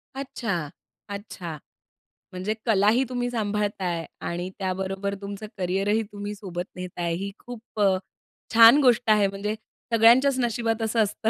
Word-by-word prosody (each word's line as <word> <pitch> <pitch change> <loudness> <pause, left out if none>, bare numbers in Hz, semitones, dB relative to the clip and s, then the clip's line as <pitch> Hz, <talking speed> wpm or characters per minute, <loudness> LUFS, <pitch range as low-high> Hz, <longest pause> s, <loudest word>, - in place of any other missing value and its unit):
अच्छा, 200 - -3 0.4
अच्छा. 190 -5 -6 0.8
म्हणजे 185 +4 -2
कलाही 220 +3 +4
तुम्ही 245 -1 -1
सांभाळत 210 -3 -1
आहे 170 -3 -1 0.2
आणि 175 +2 -3
त्याबरोबर 190 +1 -2
तुमचं 200 +1 -6
करिअरही 195 +4 +1
तुम्ही 205 0 -5
सोबत 180 -4 -5
नेत 180 0 -5
आहे 170 -1 0
ही 200 +2 -4
खूप 235 -3 -10
अ, 195 -2 +4 0.6
छान 230 +4 +9
गोष्ट 245 -3 +3
आहे 210 -2 +5
म्हणजे 200 +2 -3 0.4
सगळ्यांच्याच 255 +4 +6
नशिबात 230 -1 0
असं 225 +1 0
असतं 220 +2 -1
205 Hz, 140 wpm, -25 LUFS, 190-230 Hz, 0.8 s, छान